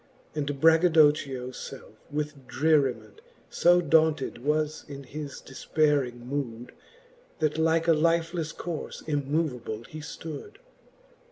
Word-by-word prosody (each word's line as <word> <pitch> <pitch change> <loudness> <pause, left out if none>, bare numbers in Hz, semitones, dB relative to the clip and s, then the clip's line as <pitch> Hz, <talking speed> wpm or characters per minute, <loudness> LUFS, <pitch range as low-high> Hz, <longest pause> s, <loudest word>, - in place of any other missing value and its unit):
And 145 -2 -3
Braggadocchio 155 -5 +4
lelfe 135 +1 -8 0.3
with 150 -2 -4
dreriment 150 - +1 0.3
So 175 +1 +5
daunted 155 -5 +2
was 155 +1 0
in 140 -1 -8
his 145 +1 -7
defpeyring 135 -3 0
mood, 125 -3 -4 0.7
That 155 -1 0
like 165 +1 +2
a - - +6
lifelefle 165 0 0
corle 170 -3 -5
immoveable 140 -6 -2
he 155 +6 -9
flood. 160 - -8
150 Hz, 105 wpm, -27 LUFS, 135-160 Hz, 0.7 s, a